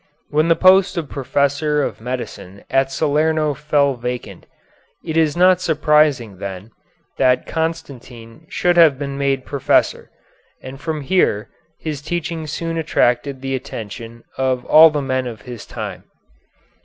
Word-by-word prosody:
When 155 +2 +2
the 165 - +4
post 190 +1 +4
of 155 -5 -3
professor 145 +2 0
of - - -4
medicine 115 -6 -6
at 135 0 +2
Salerno 155 +1 +1
fell 145 -1 +1
vacant, 125 0 -6 0.6
it 160 -2 -4
is 160 -1 +2
not 185 0 +5
surprising, 150 - +2
then, 100 +2 -7 0.5
that 125 0 +3
Constantine 140 -5 -6
should 175 -1 +1
have 160 -5 +6
been 140 0 -5
made 140 -2 -1
professor, 140 -3 0 0.5
and 135 +2 -10
from 155 -1 -3
here 135 - +1 0.3
his 150 -3 -5
teaching 165 0 -4
soon 165 +2 -3
attracted 130 -3 0
the 135 0 -2
attention 115 -2 -7 0.2
of 130 -1 0
all 160 +1 +8
the 150 -2 -2
men 130 -1 -1
of 110 -3 -8
his 120 -4 -9
time. - - -7
140 Hz, 140 wpm, -19 LUFS, 125-160 Hz, 0.6 s, all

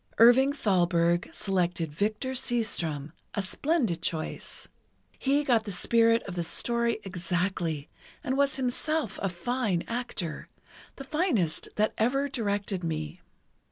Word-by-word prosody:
Irving 245 +4 +7
Thalberg 175 - +2
selected 175 -4 -1
Victor 215 - -1
Seastrom, 190 - -1 0.2
a 200 - 0
splendid 230 - 0
choice. 160 -2 -3 0.5
He 280 +2 +2
got 240 -6 +2
the 205 - -4
spirit 230 +5 +3
of 195 - -6
the 175 - -2
story 235 +7 0
exactly, 175 -4 -2 0.4
and 260 -3 0
was 280 0 +2
himself 270 0 -1
a 195 - +1
fine 190 0 -1
actor, 230 -9 -4 0.5
the 275 - -8
finest 270 - 0
that 215 +1 +2
ever 270 +5 +2
directed 205 -6 -2
me. 160 +1 -3
210 Hz, 125 wpm, -28 LUFS, 175-250 Hz, 0.5 s, Irving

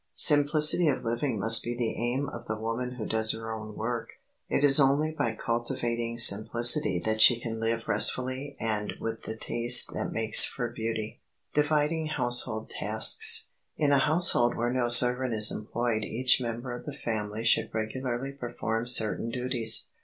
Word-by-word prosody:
Simplicity 150 +3 +4
of 135 -3 -2
living 120 +1 -3
must 110 +3 +4
be 120 0 -5
the 120 -2 -3
aim 125 +5 -3
of - - -11
the 110 - -4
woman 115 +3 -5
who 110 -4 -7
does 110 0 0
her 115 0 -7
own 110 -1 -9
work. 115 +1 -5 0.4
It - - -1
is 140 0 +7
only 145 +3 +1
by 120 -8 -4
cultivating 120 0 -4
simplicity 115 +1 +3
that 110 0 -1
she 120 +1 +6
can 115 -1 -7
live 115 0 -2
restfully 130 +2 -1
and 105 -2 -3
with 115 0 -7
the 110 - -7
taste 120 +2 +3
that - - -5
makes 110 -1 +6
for 120 -3 -3
beauty. 110 -2 -6 0.3
[Sidenote: 150 0 +1
DIVIDING 155 +1 -1
HOUSEHOLD 120 -3 -1
TASKS] - - +2 0.3
In 145 -2 0
a 140 - +3
household 150 -5 +2
where 120 +1 -2
no 125 -2 -2
servant 125 0 +5
is 105 0 +3
employed 110 +1 -4
each 125 +4 0
member 120 +1 -6
of 120 +3 -10
the 145 - -6
family 110 -4 -6
should 115 - +1
regularly 120 +4 -5
perform 120 -3 -6
certain 115 -1 0
duties. 125 -2 0
120 Hz, 170 wpm, -26 LUFS, 110-130 Hz, 0.4 s, is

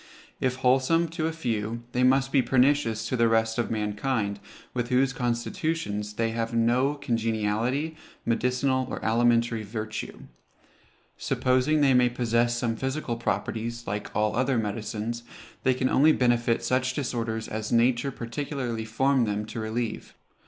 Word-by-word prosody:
If 130 -1 0
wholesome 130 +6 +2
to 160 -1 -2
a - - -1
few, 115 -6 -3
they 125 - 0
must 135 +1 +3
be 135 - +4
pernicious 125 -4 +2
to 130 - -1
the 115 -1 +3
rest 110 0 +1
of 120 - 0
mankind, 105 0 -1 0.3
with 120 -1 -2
whose 135 +1 +2
constitutions 120 - -2
they 115 +1 0
have 115 0 -2
no 125 +5 +2
congeniality, 115 +4 -1 0.3
medicinal 125 +2 +1
or - - -4
alimentary 115 0 +2
virtue. 110 +1 -5 1.0
Supposing 130 +4 +1
they 135 -2 +5
may 125 -1 +5
possess 120 0 +1
some 120 -1 -1
physical 130 0 -2
properties, 115 0 -3
like 105 +1 -5
all 105 0 +1
other 130 +1 +1
medicines, 110 +2 -3 0.4
they 130 -1 +2
can 130 0 +1
only 155 +4 +5
benefit 120 -3 +2
such 130 0 0
disorders 115 -5 -2
as 110 0 -4
nature 120 +3 +3
particularly 120 -2 -4
formed 130 +2 +2
them 105 +1 -2
to 110 - -6
relieve. 110 +1 -4
120 Hz, 145 wpm, -27 LUFS, 115-130 Hz, 1.0 s, they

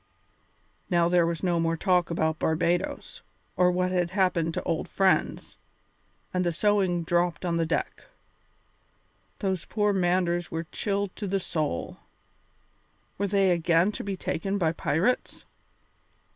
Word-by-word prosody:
Now 170 -2 +3
there 175 -1 +3
was 170 +1 -3
no 175 -2 +1
more 165 0 0
talk 180 -1 +2
about 160 -1 -1
Barbadoes, 170 +2 -1 0.3
or 180 0 +4
what 180 +1 0
had 180 -2 +1
happened 180 -4 +1
to - - -2
old 160 - -2
friends, 195 -1 0 0.8
and 180 0 +1
the 175 - +1
sewing 185 -1 +1
dropped 175 0 0
on 170 -1 0
the 165 -1 0
deck. - - -3 1.3
Those 190 -4 -2
poor 210 -1 +1
Manders 175 -2 +1
were 165 +1 -4
chilled 200 -2 -2
to 205 - -4
the 195 +1 0
soul. 155 - -3 1.2
Were 200 - +1
they 195 -1 +3
again 170 +2 +3
to - - -6
be 195 -1 -4
taken 195 +3 -2
by 165 -5 +1
pirates? 165 - -1
175 Hz, 140 wpm, -27 LUFS, 170-190 Hz, 1.3 s, or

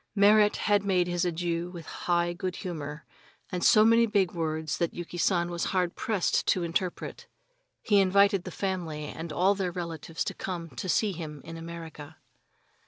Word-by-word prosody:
Merrit 210 +1 +5 0.3
made 185 -3 +2
his 175 0 -1
adieu 170 0 -2
with 170 -3 -9
high 175 0 0
good 180 +1 -4
humor, 150 -5 -6 0.5
and 180 -1 -2
so 215 0 +6
many 230 +1 +5
big 200 -5 +2
words 160 -2 -2
that 170 - -1
Yuki 175 0 -6
San 175 -1 +2
was 170 0 -2
hard 180 -2 0
pressed 210 -5 0
to 180 - +2
interpret. 170 +2 -3 0.6
He 205 -2 +4
invited 195 0 +4
the 185 - -6
family 175 -5 -3
and 160 +2 -6
all 185 +6 +3
their 190 -3 -2
relatives 165 -2 -4
to - - -3
come 170 -4 -5
to 125 +9 -5
see 210 +3 +2
him 155 -4 -7
in 165 - -8
America. 165 -2 -9
175 Hz, 170 wpm, -28 LUFS, 165-190 Hz, 0.6 s, so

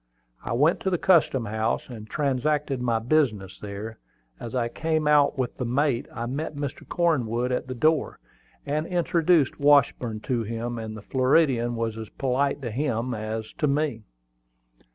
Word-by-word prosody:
I - - -3
went 150 +8 +3
to 190 - -1
the 180 - +1
custom 160 -9 +3
house, 110 +2 -1
and 110 -4 -9
transacted 140 -1 0
my 120 -2 +1
business 115 -6 0
there. 105 +2 -7 0.4
As 120 +1 -6
I 120 -2 +1
came 155 +4 -1
out 145 -2 +4
with 130 -2 -2
the - - -2
mate, 125 +1 0
I 115 - -4
met 145 +5 -4
Mr. 145 -2 -5
Cornwood 125 -8 +1
at 125 - -1
the 130 - -5
door. 155 +4 +1 0.5
I 145 +1 -1
introduced 170 -2 +2
Washburn 130 -6 +3
to 120 -1 -1
him; 115 +2 -4
and 110 -1 -6
the 105 - -10
Floridian 130 -2 +2
was 115 -1 -2
as 110 - -7
polite 140 +2 -1
to 120 - -3
him 125 -1 -1
as 110 0 -4
to 150 - +2
me. 140 -4 0
130 Hz, 165 wpm, -25 LUFS, 115-150 Hz, 0.5 s, out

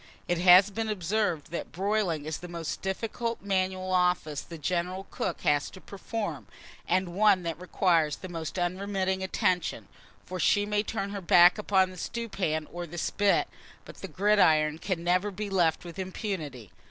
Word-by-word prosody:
It 175 -1 0
has 185 +3 +7
been 225 +1 -3
observed, 185 -5 -1
that 170 - -5
broiling 190 -5 -1
is 155 0 -4
the 180 - -8
most 170 -2 -5
difficult 225 +4 -3
manual 185 -1 -1
office 180 -5 +1
the 165 - -10
general 180 +4 -2
cook 180 - -3
has 145 0 +1
to 185 - -12
perform, 205 +3 -5 0.4
and 185 0 +1
one 195 -1 +4
that 165 0 -4
requires 170 -5 +2
the 185 - -9
most 165 -1 -5
unremitting 190 +1 -1
attention; 185 -2 -1 0.4
for 185 0 -6
she 205 +3 +3
may 210 0 +1
turn 200 -2 -4
her 200 -1 -5
back 175 +2 +6
upon 190 -3 +2
the 185 - -12
stewpan 185 -10 -3
or 175 0 -5
the 175 +2 -9
spit, 200 +4 +1 0.4
but - - -12
the - - -7
gridiron 160 -7 +3
can 180 -3 -3
never 180 +4 +2
be 205 +1 -5
left 175 -3 +1
with 170 +1 -9
impunity. 170 - -5
185 Hz, 165 wpm, -28 LUFS, 170-200 Hz, 0.4 s, has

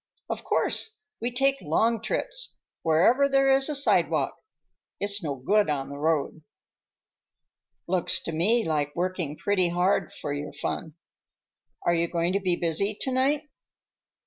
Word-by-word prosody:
"Of - - -4
course. 440 0 0 0.2
We 240 - -1
take 270 +2 +2
long 220 +9 +1
trips; - - -3 0.3
wherever 230 - +4
there 270 0 +4
is 270 +2 +3
a 300 - -1
sidewalk. 280 - +2 0.7
It's 200 0 +1
no 145 -3 -2
good 200 +9 +2
on 140 -2 -2
the 140 0 -7
road." 155 0 0 1.5
"Looks 180 0 +1
to - - -4
me 215 +9 +2
like 145 -2 -1
working 175 -4 -2
pretty 185 -3 +2
hard 180 +1 +1
for 145 - -5
your 145 0 -5
fun. 155 +1 -4 0.9
Are 175 - +3
you 170 0 +1
going 170 +1 0
to 200 - +2
be 185 -3 +1
busy 175 +5 0
to 265 - -1
night? 280 +4 +1
185 Hz, 145 wpm, -26 LUFS, 160-250 Hz, 1.5 s, wherever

